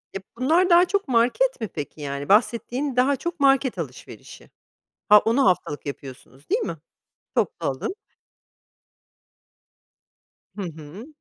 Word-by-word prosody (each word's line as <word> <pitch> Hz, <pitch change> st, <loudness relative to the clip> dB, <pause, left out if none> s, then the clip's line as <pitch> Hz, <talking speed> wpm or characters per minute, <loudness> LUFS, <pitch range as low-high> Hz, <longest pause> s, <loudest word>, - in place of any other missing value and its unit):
E, -, -, -2 dB, 0.2 s
bunlar 325 Hz, +9 st, +2 dB
daha 350 Hz, +1 st, +6 dB
çok 400 Hz, -3 st, -1 dB
market 255 Hz, -, +1 dB
mi 220 Hz, -, -2 dB
peki 150 Hz, -2 st, -8 dB
yani 140 Hz, 0 st, -5 dB
bahsettiğin, 245 Hz, +5 st, +1 dB
daha 260 Hz, +3 st, +3 dB
çok 340 Hz, +4 st, -5 dB
market 270 Hz, -1 st, +3 dB
alışverişi? -, -, -9 dB, 0.6 s
Ha, 210 Hz, 0 st, +9 dB
onu 230 Hz, +6 st, +1 dB
haftalık 165 Hz, -6 st, -1 dB
yapıyorsunuz, 135 Hz, 0 st, -10 dB
değil -, -, +1 dB
mi? 165 Hz, -, -4 dB, 0.6 s
Toplu -, -, -1 dB
alım. 135 Hz, -, -3 dB, 2.6 s
Hı 205 Hz, -, -6 dB
hı. 165 Hz, -, -9 dB
235 Hz, 125 wpm, -23 LUFS, -, 2.6 s, Ha